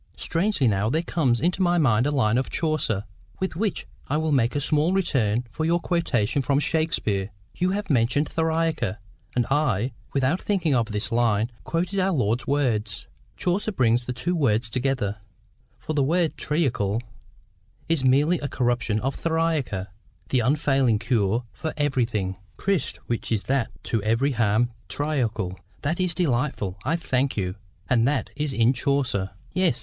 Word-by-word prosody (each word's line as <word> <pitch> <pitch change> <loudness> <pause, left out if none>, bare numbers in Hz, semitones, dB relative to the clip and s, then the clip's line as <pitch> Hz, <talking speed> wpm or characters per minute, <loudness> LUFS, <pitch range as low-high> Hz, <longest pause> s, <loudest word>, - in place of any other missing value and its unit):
"Strangely 165 - +1
now, 105 0 +1
there 160 +7 +1
comes 135 -9 +1
into 180 +3 +1
my 175 -1 +3
mind 125 -5 +3
a - - +2
line 125 -5 +2
of 130 - -2
Chaucer, 155 - 0 0.4
with 190 -3 -2
which 205 +2 -1 0.2
I 150 - 0
will 160 0 0
make 130 -2 +2
a - - +2
small 150 +4 +2
return 125 - +1
for 155 - -3
your 170 +2 +2
quotation 140 -8 0
from 140 +2 +2
Shakespeare; 145 -12 0 0.2
you 180 +1 0
have 205 0 -2
mentioned 130 +4 +2
theriaca; 160 - 0 0.4
and 120 -1 +2
I, 135 -5 +1 0.2
without 140 +6 +1
thinking 180 -7 +1
of 120 -3 +2
this 105 -1 -2
line, 115 -1 +2
quoted 180 +4 -1
our 190 0 +2
Lord's 120 -4 0
words. 115 -7 0 0.3
Chaucer 190 +4 0
brings 120 - +2
the - - -1
two 140 -5 +1
together, 120 -3 -1 0.6
for 155 - -5
the 145 - +2
word 165 +4 +1
triacle 120 -8 0 0.8
is 165 -5 +1
merely 145 +6 +4
a 145 - -3
corruption 120 -4 0
of 135 +2 -1
theriaca, 160 - -1 0.4
the 130 - +2
unfailing 135 -2 +2
cure 115 -1 +1
for 160 - -4
every 135 -5 +2
thing. 95 -5 -3 0.2
'Crist, 195 -7 -1
which 120 - -3
that 135 -3 +1
is - - -24
to 115 - -1
every 115 +7 +1
harm 115 0 +2 0.2
triacle.'" 115 -11 -1 0.2
"That 155 +5 -1
is 180 -2 +1
delightful: 125 - -1
I 155 +5 +1
thank 135 -6 0
you. 90 -2 -1 0.3
And 120 -1 +3
that 140 -2 0
is 150 0 -1
in 120 0 +3
Chaucer?" 125 -7 0 0.2
"Yes. 180 -9 +2
135 Hz, 160 wpm, -25 LUFS, 115-160 Hz, 0.8 s, merely